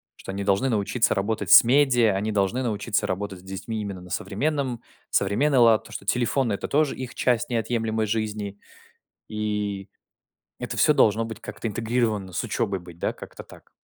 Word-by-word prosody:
Что - - -8
они 100 0 -4
должны 100 +7 +2
научиться 110 +2 +1
работать 105 +2 -2
с - - +10
медиа, 120 -5 +4
они 105 +3 -1
должны 105 +5 0
научиться 105 -2 -1
работать 95 -1 -4
с - - -22
детьми 100 +3 -5
именно 100 -3 -5
на 90 0 -13
современном 125 - -2 0.3
современный 130 +9 +2
лад, 115 -2 +5
то, - - -15
что - - -7
телефоны- 125 -1 +1
это 100 - -4
тоже 150 -1 +2
их 130 -1 -7
часть 120 -1 0
неотъемлемой 115 -2 -1
жизни. 105 -2 -3 0.7
И 105 -2 -3 0.7
это - - -4
всё 150 - +4
должно 115 -5 +3
быть 110 -1 -7
как-то 115 - -5
интегрировано 110 -4 -1
с - - -1
учебой 95 -1 -1
быть, 85 -1 -14
да, - - -1
как-то - - -11
так. - - -17
110 Hz, 175 wpm, -25 LUFS, 100-120 Hz, 0.7 s, с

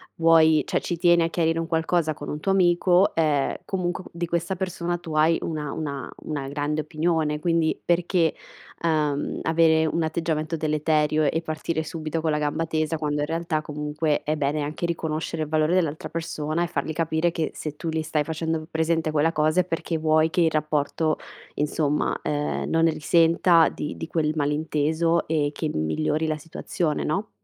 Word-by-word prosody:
vuoi 160 -2 +5
cioè - - 0
ci 175 - -3
tieni 175 0 +4
a 165 - 0
chiarire 165 -1 +1
un 165 - -2
qualcosa 160 -1 +1
con 145 -1 -8
un 150 - -4
tuo 195 +5 +1
amico, 180 0 +4
ehm 150 -4 +2 0.2
comunque 180 -1 -2
qu - - -11
di 170 +1 -2
questa 170 +2 -1
persona 175 -2 -2
tu 170 -2 -8
hai 160 +2 +4
una 150 -3 -3
una 140 -4 -4
una 145 -3 -4
grande 145 +2 -1
opinione 155 0 0
quindi 165 -1 +1
perché, 175 -1 +2 0.5
uhm, 150 -3 0
avere 160 -1 +4
un 165 +2 0
atteggiamento 160 0 -1
deleterio 155 0 +1
e 165 - -1
partire 160 0 -3
subito 155 0 -4
con 160 -1 0
la 150 - +1
gamba 150 +2 -1
tesa 155 0 -1
quando 150 -1 -2
in 145 - -1
realtà 165 -1 -1
comunque 150 0 -2
è 155 - 0
bene 150 +1 0
anche 150 +4 -3
riconoscere 160 -1 -2
il 150 - -6
valore 155 +1 +2
dell'altra 160 -4 0
persona 160 0 -2
e - - -1
fargli 160 -2 -3
capire 160 +1 +1
che 165 -2 -2
se 155 -2 -6
tu 165 - -4
li 160 0 -1
stai 155 -1 0
facendo 160 +1 -2
m - - -10
presente 160 0 0
quella 155 +2 +2
cosa 155 -1 +2
è - - -5
perché 165 -1 -2
vuoi 155 0 +3
che 180 0 +1
il 165 -1 +3
rapporto 155 +1 0 0.4
insomma, 150 0 0
ehm, 150 0 -2
non 165 0 +2
ne 165 - +4
risenta 165 +2 +4
di 150 - -5
di - - -5
quel 155 -2 0
malinteso 155 +2 0
e 150 -2 +1
che 155 +1 -3
m - - -2
migliori 155 - 0
la 155 -1 -1
situazione, 155 0 -3
no? 195 +7 -2
160 Hz, 190 wpm, -24 LUFS, 150-165 Hz, 0.5 s, vuoi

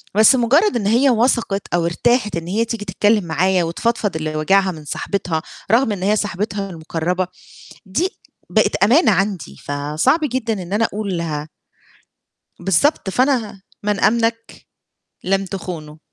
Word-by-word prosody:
بس 220 +5 +7
مجرد 280 - +3
إن 210 -4 0
هي 250 +5 +4
وثقِت 230 -4 +1
أو 170 -1 +2
ارتاحت 210 +3 +1
إن 165 0 -4
هي 220 +5 0
تيجي 220 -2 -5
تتكلم 205 +2 +2
معايا، 175 +3 +1
وتفضفض 205 +3 -1
اللي 155 -1 -3
واجِعها 190 +5 +2
من 155 -3 -10
صاحبتها، 165 +1 -2 0.3
رغم 230 0 +4
إن 190 -3 -4
هي 205 +2 +3
صاحبتها 200 0 -2
المقربة، 170 +2 -2 0.6
دي 330 - 0 0.4
بقت - - +2
أمانة 235 - +4
عَندي 190 - -1
فصعب 150 - 0
جدًا 235 -3 -1
إن 175 +2 -9
أنا 215 +3 +2
أقولها 170 -8 -3 1.1
بالضبط 195 - +1
فأنا 250 -1 +1
ه 195 - -17 0.2
من 205 -1 0
أمنَك 230 0 0 0.6
لم 195 +1 +1
تخونه. 170 -5 -7
195 Hz, 140 wpm, -19 LUFS, 170-230 Hz, 1.1 s, بس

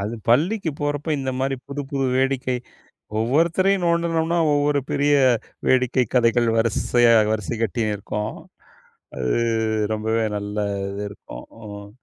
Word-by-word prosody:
அது 105 +4 -3
பள்ளிக்கு 165 - +2
போறப்ப 145 +1 -2
இந்த 135 -1 -2
மாரி 135 0 0
புது 140 +1 -4
புது 135 -2 0
வேடிக்கை 130 -1 0 0.6
ஒவ்வொருத்தரையும் 170 - +2
நோண்டுனோம்னா, 170 0 +1 0.2
ஒவ்வொரு 145 0 +2
பெரிய 145 +1 +2 0.5
வேடிக்கை 130 0 +3
கதைகள் 120 -1 +3
வரிசையா, 115 +1 +3 0.2
வரிசை 110 +1 -3
கட்டின்னு 110 0 0
இருக்கும் 105 +2 -4 0.8
அது 65 -1 -1 0.6
ரொம்பவே 110 +1 0
நல்ல 105 +1 -5 0.3
இது 100 +1 -5
இருக்கும். - - -11 0.2
ம். 100 0 -9
130 Hz, 120 wpm, -22 LUFS, 110-145 Hz, 0.8 s, வேடிக்கை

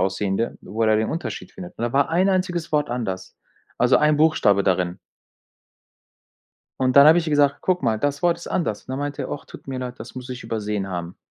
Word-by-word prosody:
aussehende 95 +3 -1
wo 110 +4 -4
er - - +3
da 110 - +4
den 110 0 0
Unterschied 155 - -5
findet. 90 -1 -10
Und - - -6
da 120 - -2
war 140 +1 +3
ein 180 +4 +2
einziges 180 -3 -1
Wort 150 -1 +1
anders. 95 -7 -4 0.4
Also 125 +1 +5
ein 150 0 +3
Buchstabe 150 -11 +3
darin. 90 -2 0 1.8
Und 130 -1 +2
dann 140 +2 +9
habe 165 +2 +7
ich 170 - -2
ihr 155 - -2
gesagt: 145 -1 +3
„Guck 180 -4 0
mal, 110 -3 +1
das 145 +4 -1
Wort 170 -1 +3
ist 170 - -11
anders.” 135 - -2
Und - - -12
dann 130 +2 -3
meinte 145 0 -3
er: - - -6
„Ach, 145 - -6
tut - - -13
mir 130 -1 -4
leid, 125 0 -6
das 110 - -10
muss 130 0 -8
ich 125 -2 -7
übersehen 105 -3 -3
haben.“ 90 -2 -5
125 Hz, 230 wpm, -23 LUFS, 105-150 Hz, 1.8 s, dann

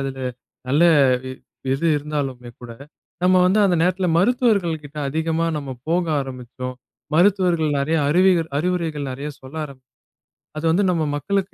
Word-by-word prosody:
அதுல 135 -1 -4 0.5
நல்ல 145 +5 +3 0.4
வி 130 - -5 0.4
இது 165 +5 -1
இருந்தாலுமே 140 -5 -4
கூட 120 -1 -9 0.5
நம்ம 185 +1 +4
வந்து 195 +4 +3
அந்த 180 -3 +3
நேரத்துல 185 +1 +1
மருத்துவர்கள் 200 -7 +2
கிட்ட 145 +1 -12
அதிகமா 160 +2 -1
நம்ம 140 -2 -5 0.2
போக 175 +1 +2 0.2
ஆரம்பிச்சோம். 125 -1 -7 0.4
மருத்துவர்கள் 175 -3 +3
நிறைய 155 +4 0
அறிவிகள் 175 0 +3
அறிவுரைகள் 160 -5 -2
நிறைய 140 +3 -5
சொல்ல 135 +4 -11
ஆரம் 135 -3 -11 0.8
அது 160 - -3
வந்து 195 +5 +2
நம்ம 165 -3 0
மக்களுக்கு 195 +7 -2
160 Hz, 140 wpm, -21 LUFS, 140-180 Hz, 0.8 s, நம்ம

